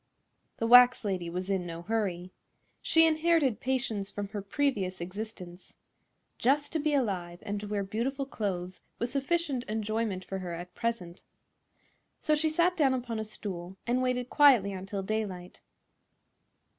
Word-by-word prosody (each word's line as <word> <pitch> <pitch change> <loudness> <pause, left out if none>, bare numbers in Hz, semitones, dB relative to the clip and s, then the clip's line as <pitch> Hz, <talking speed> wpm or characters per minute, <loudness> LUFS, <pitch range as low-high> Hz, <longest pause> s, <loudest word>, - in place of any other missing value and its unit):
The 230 - -1
wax 245 0 +7
lady 185 -4 -2
was 180 +2 -4
in 190 -3 -1
no 170 0 -7
hurry. 185 -4 -2 0.5
She 325 0 +5
inherited 315 -5 +2
patience 245 -7 -1
from 205 -1 -5
her 210 -1 -4
previous 200 -4 -1
existence. 185 -1 -8 0.6
Just 290 +4 +2
to 320 - +1
be 300 0 +1
alive 185 -9 -1
and 205 -1 -3
to 210 - -6
wear 205 -1 -1
beautiful 250 +8 -2
clothes 185 -7 -4 0.2
was 235 +1 -2
sufficient 280 -1 0
enjoyment 215 -3 -2
for 195 - -4
her 180 -2 -5
at 175 +1 -8
present. 195 -7 -3 1.0
So 305 - +1
she 310 +1 +2
sat 345 +3 +2
down 275 -5 +3
upon 240 -3 -3
a - - -2
stool 190 -4 -7
and 245 +2 +1
waited 250 -1 0
quietly 255 -9 +6
until 195 +1 -5
daylight. 190 -4 -4
215 Hz, 150 wpm, -29 LUFS, 185-260 Hz, 1.0 s, wax